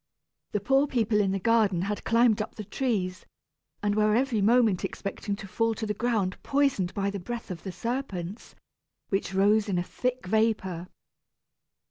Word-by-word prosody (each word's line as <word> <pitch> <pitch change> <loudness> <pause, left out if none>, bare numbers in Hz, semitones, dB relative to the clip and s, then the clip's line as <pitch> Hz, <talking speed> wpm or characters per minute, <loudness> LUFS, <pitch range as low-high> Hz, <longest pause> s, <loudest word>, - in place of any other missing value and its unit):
The 210 - +1
poor 270 +8 +3
people 225 -5 +1
in 195 -2 +1
the 195 - 0
garden 205 -4 +3
had 205 +1 -3
climbed 230 -2 +3
up 215 - -6
the 215 - -6
trees, 195 -6 -2 0.6
and 205 0 +2
were 210 0 +3
every 245 -3 +1
moment 220 -3 +4
expecting 200 +1 -3
to 200 -1 -9
fall 225 +3 0
to 220 - -3
the 210 - -1
ground 210 -4 -1
poisoned 275 -11 +1
by 200 0 0
the 200 - -4
breath 230 +3 -6
of 170 -3 -6
the 190 - -5
serpents, 215 -5 -4 0.5
which 195 0 -1
rose 205 +2 +3
in 185 - 0
a 175 - +1
thick 250 +5 -3
vapor. 190 -4 0
210 Hz, 170 wpm, -27 LUFS, 195-230 Hz, 0.6 s, moment